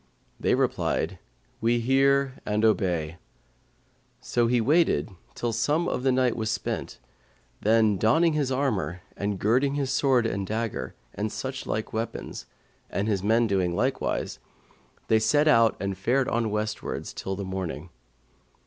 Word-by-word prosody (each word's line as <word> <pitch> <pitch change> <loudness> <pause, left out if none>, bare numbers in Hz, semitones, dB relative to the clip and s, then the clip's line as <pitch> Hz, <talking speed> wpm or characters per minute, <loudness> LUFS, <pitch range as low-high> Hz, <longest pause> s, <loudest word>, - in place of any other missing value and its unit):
They - - +2
replied, - - 0 0.4
'We 120 +1 +2
hear 135 +2 +3
and 105 +1 -1
we 110 - +7
obey:' 85 -6 -1 1.0
so 120 -1 +1
he 120 +1 +2
waited 125 - +2 0.2
till 120 -1 -2
some 150 +9 +1
little - - 0
of - - -4
the 130 0 +2
night 130 -2 +2
was 110 -1 -2
spent 110 -2 -3 0.6
then, 110 -1 +3
donning 160 - +3
his 145 -3 0
armour 100 - -1
and 100 0 -2
girding 130 +8 +2
his 140 -2 -1
sword 130 -3 +3
and 100 -3 -2
dagger 110 +1 -3 0.2
and 105 +2 -3
such 130 0 -5
like 110 - -3
weapons, 115 +1 -4 0.4
and 100 - -2
his 100 -4 0
men 115 +4 +3
doing 95 -5 0
likewise, - - -1 0.7
they 110 - +4
set 145 +7 +3
out 115 -6 +5
and 100 -1 -2
fared 130 +6 +1
on 115 -1 0
westwards 105 0 -3
till 95 0 -4
morning. 95 -4 -4
115 Hz, 150 wpm, -26 LUFS, 100-130 Hz, 1.0 s, we